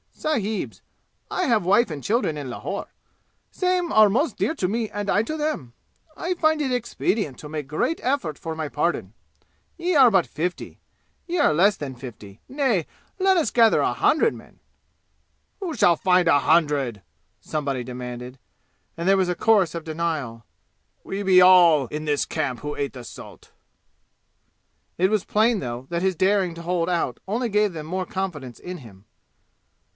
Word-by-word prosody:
"Sahibs, 220 -9 -2 0.5
I 370 - -1
have 220 -7 +2
wife 205 +5 +4
and 145 -4 -6
children 210 -8 0
in 140 -3 -6
Lahore. 195 +11 -5 0.6
Same 365 -2 0
are 215 -1 +6
most 255 +5 0
dear - - 0
to 185 - -1
me 220 +2 -2
and 205 -1 -4
I 210 - +3
to 310 +7 -4
them. 295 - -3 0.4
I 360 +2 -2
find 315 -2 +2
it 270 -3 -1
expedient 220 - -1
to 150 - -9
make 150 -2 -5
great 155 - -1
effort 255 - -1
for 160 -1 -5
my 160 -1 -3
pardon. 145 - -1 0.6
Ye 350 0 -1
are 260 -5 +7
but 190 -4 +3
fifty. 175 +3 -4 0.5
Ye 355 +1 -2
are 155 - +4
less 195 +6 +4
than 140 -7 -6
fifty. 115 -5 -11
Nay, 260 - 0 0.3
let 380 0 +4
us 310 -10 +2
gather 230 +1 +4
a - - +1
hundred 455 - +2
men." - - -15 1.0
"Who 355 -6 -4
shall 170 - +4
find 180 +1 +2
a 145 -3 +5
hundred?" 145 - +1 0.4
somebody 140 -4 -3
demanded, 125 0 -7 0.6
and 170 +3 -1
there 195 - +5
was 185 -2 +1
a 180 - 0
chorus 200 -6 +3
of 170 -1 -5
denial. 155 -8 -3 0.6
"We 195 +1 -4
be 185 -2 +6
all 175 -7 +6
in 150 +5 -5
this 145 -1 0
camp 125 -4 -3
who 145 +2 -5
ate 140 -1 -3
the 125 -2 -9
salt." 115 - -12 1.5
It 185 +1 +4
was 215 -3 +1
plain, 220 +1 +2
though, 125 -1 -6
that 170 0 -2
his 190 -1 +1
daring 190 0 +2
to 170 - -8
hold 175 0 -1
out 165 -9 -1
only 230 +4 -1
gave 210 -2 +2
them 155 -2 -7
the - - -9
more 185 0 -1
confidence 160 -11 -5
in 180 0 -7
him. 105 -6 -15
180 Hz, 175 wpm, -23 LUFS, 145-220 Hz, 1.5 s, are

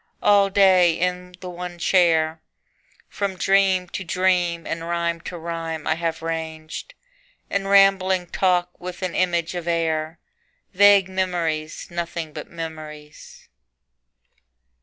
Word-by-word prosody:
All 200 -1 +5
day 190 -3 +5
in 180 0 -2
the 180 - -6
one 175 0 -7
chair 165 -3 +2 0.7
From 200 -2 -3
dream 190 -1 +2
to 195 - -5
dream 180 -2 0
and 165 - -4
rhyme 170 -1 -1
to 175 - -7
rhyme 165 -1 -5
I 160 - +2
have 165 0 -3
ranged 160 - -5 0.6
In 195 0 -1
rambling 195 -2 +4
talk 180 0 0
with 180 +1 -7
an 180 -2 -2
image 175 -2 0
of 175 -1 -5
air: 160 -1 -1 0.6
Vague 200 0 +6
memories, 170 -5 -2
nothing 170 -2 -4
but - - -8
memories. 155 -2 -9
175 Hz, 120 wpm, -22 LUFS, 165-185 Hz, 0.7 s, Vague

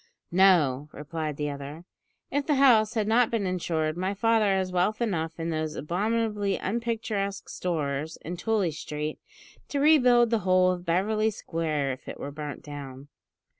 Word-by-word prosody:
"No," 160 -7 +4
replied 150 0 -5
the 150 -1 -2
other. 140 +4 -8 0.5
"If 285 0 -1
the 300 - +3
house 235 -5 +5
had 215 -2 0
not 230 +1 +4
been 225 -4 -1
insured 165 -4 -1
my 185 +3 -2
father 225 -1 +3
has 190 -1 -1
wealth 180 +4 +1
enough 165 -8 -2
in 165 +1 -2
those 155 -1 -2
abominably 210 +4 -1
unpicturesque 220 -3 -2
stores 155 -3 -3
in 175 +3 -4
Tooley 200 -1 0
Street 150 0 -5 0.5
to 285 - -2
rebuild 250 -6 +5
the 230 - +3
whole 185 -1 +3
of 180 -1 -5
Beverly 215 +6 +2
Square 155 -8 -2
if 130 - -8
it - - -7
were 140 - -5
burnt 150 0 -7
down. 140 -2 -9
185 Hz, 160 wpm, -27 LUFS, 155-220 Hz, 0.5 s, house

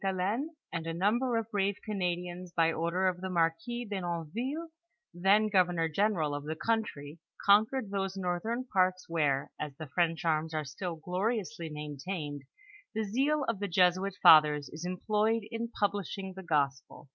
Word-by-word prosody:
Helaine, 195 +8 0 0.3
and 165 -1 -3
a 165 - -2
number 230 +7 +2
of 225 0 -3
brave 200 -1 +1
Canadians, 180 -3 -3
by 165 -1 +3
order 170 +4 0
of 180 -1 -1
the 190 - -3
marquis 170 +8 0
d'Enonville, 205 - -3 0.4
then 195 +5 +4
governor 180 -5 +2
general 165 -4 +1
of 145 0 -4
the 160 +1 -3
country, 165 -7 -2 0.3
conquered 215 +2 +4
those 195 -1 -2
northern 195 +7 -2
parts 185 -1 +2
where, 145 -5 0
as 145 -2 -5
the 160 - -6
French 165 +1 0
arms 160 0 0
are 155 -1 -1
still 165 +5 -5
gloriously 185 +2 -2
maintained, 150 0 -5 0.5
the 220 - 0
zeal 270 +7 +1
of 230 -4 -1
the 200 - -2
Jesuit 185 +2 +2
fathoi's 150 -3 +7
is 160 +3 -7
employed 215 +5 +1
in 230 0 -3
publishing 200 -3 -2
the 190 - -7
gospel. 140 -5 -1
185 Hz, 155 wpm, -31 LUFS, 165-210 Hz, 0.5 s, fathoi's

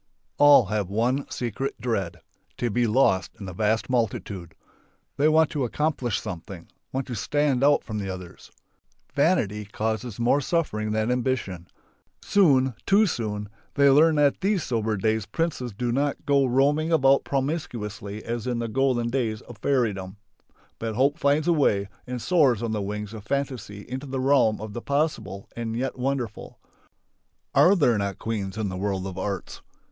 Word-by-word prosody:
All 145 -5 +8
have 100 -1 -2
one 120 +7 0
secret 125 +3 -4
dread: 105 -7 -2 0.4
To 120 -2 -1
be 120 +2 +1
lost 105 -5 +2
in 100 - -7
the 90 - -6
vast 110 +4 0
multitude. 100 -8 -2 0.6
They 145 - +4
want 160 0 +4
to 145 -3 -1
accomplish 130 -2 -1
something, 90 +1 -8 0.2
want 135 0 -2
to 125 - -6
stand 140 +3 0
out 145 0 +4
over 110 -2 -3
the 100 -1 -4
others. 90 -2 -9 0.6
Vanity 115 - +1
causes 110 +2 -3
more 125 +5 +3
suffering 130 -10 -1
than 110 +2 0
ambition. 120 -9 -2 0.5
Soon, 135 -10 +3
too 205 +2 +5
soon, 105 - -3 0.3
they 140 -1 +5
learn 155 +3 +5
that, 145 +2 +2
these 195 -3 +1
sober 110 -3 -1
days 110 +1 0
princes 160 -7 -2
do 120 +4 -2
not 140 +3 -1
go 140 -1 +3
roaming 145 +6 +2
about 135 -4 +4
promiscuously 115 - -3
as 120 0 -3
in 125 -1 -1
the 115 0 -2
golden 125 0 +1
days 115 -5 -1
of 120 -3 -13
fairydom. 105 -9 0 0.6
But 115 -1 -3
hope 140 +6 +2
finds 145 +2 +2
a 175 - +5
way 100 -10 +2 0.2
and 125 0 -4
soars 135 - +3
on 115 - -1
the 105 -1 -1
wings 105 +1 -4
of 110 -2 -8
fantasy 130 -7 -3
into 130 +3 -5
the 135 0 -3
realm 130 -5 +3
of 110 -1 -6
the 120 - -5
possible 130 -10 -2
and 115 -1 -3
yet 130 +1 -3
wonderful. 125 -4 -3 0.9
Are 190 +3 +6
there 125 - +3
not 100 -1 -2
queens 105 -3 -4
in 105 -3 -1
the 95 - -5
world 95 -1 -2
of 95 -2 -5
arts? 100 0 -4
120 Hz, 165 wpm, -25 LUFS, 105-140 Hz, 0.9 s, All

